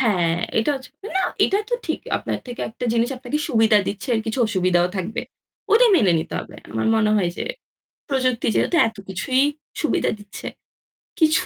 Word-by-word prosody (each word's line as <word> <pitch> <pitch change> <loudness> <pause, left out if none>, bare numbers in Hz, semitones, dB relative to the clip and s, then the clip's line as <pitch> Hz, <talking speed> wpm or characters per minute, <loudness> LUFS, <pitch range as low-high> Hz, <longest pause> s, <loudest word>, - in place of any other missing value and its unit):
হ্যাঁ 180 -9 +2 0.2
এটা 225 +7 +2
হচ্ছে 260 -2 -8 0.3
না - - +3 0.2
এটা 400 - +2
তো - - +3
ঠিক, - - -1 0.2
আপনার - - -3
থেকে 245 - -7
একটা 235 +2 -7
জিনিস 235 +1 +2
আপনাকে 260 +4 -3
সুবিধা 220 -2 +5
দিচ্ছে 210 +6 -4 0.2
কিছু 225 +4 -2
অসুবিধাও 180 -4 +2
থাকবে। 190 +4 -3 0.5
ওইটা 465 +4 +7
মেনে 190 -6 +4
নিতে 160 - -4
হবে। - - -11
আমার 110 0 -1
মনে 215 -1 +3
হয় 180 -4 +1
যে, - - -3 0.7
প্রযুক্তি 255 -3 +1
যেহেতু - - +2
এত 220 - -8
কিছুই 255 +8 +1 0.4
সুবিধা - - +1
দিচ্ছে। 205 0 -9 0.7
কিছু 315 0 +4
225 Hz, 170 wpm, -22 LUFS, 190-260 Hz, 0.7 s, ওইটা